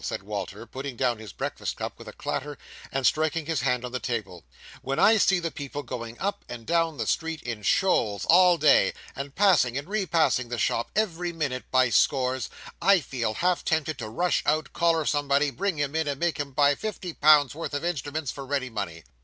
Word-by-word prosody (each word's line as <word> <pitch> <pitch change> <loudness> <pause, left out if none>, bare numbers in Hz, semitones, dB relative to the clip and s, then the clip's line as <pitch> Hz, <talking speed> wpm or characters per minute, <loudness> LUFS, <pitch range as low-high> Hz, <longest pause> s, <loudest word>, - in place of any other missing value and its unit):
said - - -4
Walter, 100 +1 -5
putting 135 +3 -6
down 120 -3 0
his 110 -4 -9
breakfast - - -4
cup - - -5
with - - -11
a - - -6
clatter, 145 +1 -4 0.3
and 135 -1 -1
striking 155 +3 +1
his 160 -4 -1
hand 125 -1 0
on 125 - -6
the 130 - -3
table: 110 -10 -4 0.4
"when 135 +1 -3
I 220 +2 +6
see 190 -2 +4
the 165 -2 -3
people 145 0 -6
going 120 -2 -6
up 200 +1 -2
and 120 -2 -8
down 165 -1 +1
the - - -2
street 165 -1 -1
in 115 -3 -5
shoals 105 - +1
all 180 0 +6
day, 150 -2 +4 0.2
and 140 0 -6
passing 150 - +4
and 145 - -5
re 200 -1 -1
passing 155 -8 +2
the 120 - -3
shop 115 +1 0
every 180 -5 0
minute, 140 -6 -3
by 130 -1 +3
scores, 130 -1 +2 0.3
I 200 -1 +5
feel 120 -7 -3
half 180 0 +1
tempted 155 -2 -1
to 110 -3 -5
rush 175 +11 +1
out, 155 +1 0
collar 165 -2 +2
somebody, 145 0 +1
bring 170 +7 -2
him 145 +1 -2
in, 160 -1 0
and 140 -1 -2
make 170 -3 0
him 145 -1 -3
buy 145 +1 +4
fifty 185 0 -5
pounds' 150 -3 +5
worth 155 -1 -5
of 145 - -3
instruments 150 -3 -2
for 140 - -8
ready 135 -2 -2
money. 90 -7 -5
145 Hz, 210 wpm, -26 LUFS, 125-165 Hz, 0.4 s, I